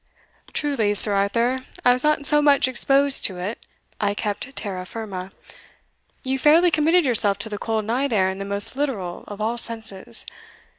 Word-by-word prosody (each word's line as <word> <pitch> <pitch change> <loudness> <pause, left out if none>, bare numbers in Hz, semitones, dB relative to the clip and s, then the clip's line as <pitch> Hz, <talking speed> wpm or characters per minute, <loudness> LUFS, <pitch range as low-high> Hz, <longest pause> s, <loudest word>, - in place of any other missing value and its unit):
"Truly, 235 -9 -1
Sir 205 0 +7
Arthur, 230 +6 -1 0.3
I 245 - +5
was 250 - -3
not 300 -1 0
so 295 0 +7
much 285 -3 +3
exposed 275 +2 +2
to 185 - 0
it 190 +6 -7 0.4
I 205 -1 -1
kept 210 +7 -5
terra 190 -3 -4
firma 190 -2 -8 0.9
you 265 0 -3
fairly 325 +5 +4
committed 320 +2 +2
yourself 210 -6 +3
to 200 +2 -3
the 205 -1 -7
cold 220 -2 -3
night 255 +5 -2
air 190 -4 +1
in 190 +1 -5
the 195 - -6
most 200 +4 +2
literal 220 -12 -4
of 205 0 -10
all 225 +3 -3
senses. 220 -4 0
225 Hz, 170 wpm, -21 LUFS, 200-275 Hz, 0.9 s, Sir